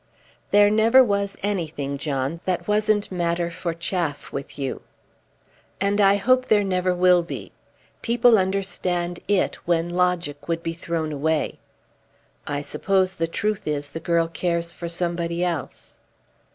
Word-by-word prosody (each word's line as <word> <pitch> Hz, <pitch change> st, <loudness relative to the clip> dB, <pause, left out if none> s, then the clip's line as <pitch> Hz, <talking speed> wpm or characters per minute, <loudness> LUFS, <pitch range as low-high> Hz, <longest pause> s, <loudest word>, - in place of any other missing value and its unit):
"There 205 Hz, 0 st, +5 dB
never 225 Hz, +5 st, +6 dB
was 200 Hz, -3 st, -1 dB
anything, 155 Hz, -8 st, -2 dB
John, 140 Hz, +2 st, -2 dB
that 175 Hz, -2 st, -1 dB
wasn't 210 Hz, -1 st, +1 dB
matter 170 Hz, -1 st, -1 dB
for 170 Hz, 0 st, -3 dB
chaff 165 Hz, -2 st, -3 dB
with 140 Hz, +1 st, -6 dB
you." 135 Hz, -2 st, -3 dB, 1.0 s
"And 200 Hz, +1 st, +1 dB
I 195 Hz, 0 st, +6 dB
hope 255 Hz, +5 st, +2 dB
there 210 Hz, -1 st, +4 dB
never 185 Hz, -1 st, +1 dB
will 180 Hz, 0 st, +5 dB
be. 170 Hz, -, -7 dB, 0.5 s
People 235 Hz, -1 st, +4 dB
understand 185 Hz, -2 st, -1 dB
it 205 Hz, -1 st, +2 dB
when 170 Hz, 0 st, +1 dB
logic 175 Hz, -4 st, -1 dB
would 165 Hz, 0 st, -2 dB
be 165 Hz, -1 st, -2 dB
thrown 165 Hz, -2 st, -3 dB
away. 150 Hz, +1 st, -1 dB, 0.9 s
I 145 Hz, 0 st, -2 dB
suppose 190 Hz, +3 st, 0 dB
the 165 Hz, -3 st, -1 dB
truth 210 Hz, +3 st, -2 dB
is 145 Hz, -1 st, -2 dB
the 165 Hz, -, -6 dB
girl 170 Hz, 0 st, +1 dB
cares 170 Hz, 0 st, -2 dB
for 170 Hz, -1 st, -6 dB
somebody 170 Hz, 0 st, -2 dB
else." 170 Hz, -6 st, -5 dB
175 Hz, 140 wpm, -23 LUFS, 165-195 Hz, 1.0 s, never